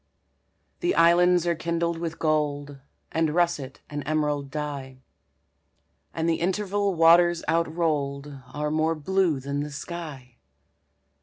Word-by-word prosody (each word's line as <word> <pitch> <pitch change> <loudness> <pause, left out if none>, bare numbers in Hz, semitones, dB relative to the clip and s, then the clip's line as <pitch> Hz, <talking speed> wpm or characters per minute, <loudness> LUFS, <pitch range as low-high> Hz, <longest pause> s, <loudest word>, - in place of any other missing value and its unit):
The 350 +1 0
islands 175 +1 +5
are 170 - +2
kindled 170 +1 -2
with 165 -1 -4
gold 145 -2 -1 0.3
And 160 -1 0
russet 170 -7 0
and 145 0 -5
emerald 150 -2 0
dye; 135 -3 -6 1.1
And 165 0 -2
the 165 -1 0
interval 200 +1 0
waters 170 +1 +5
outrolled 150 -4 -1
Are 150 0 -2
more 160 +1 +1
blue 170 -1 +1
than 140 +2 -3
the 150 - -4
sky. 140 -5 -8
160 Hz, 120 wpm, -25 LUFS, 145-170 Hz, 1.1 s, islands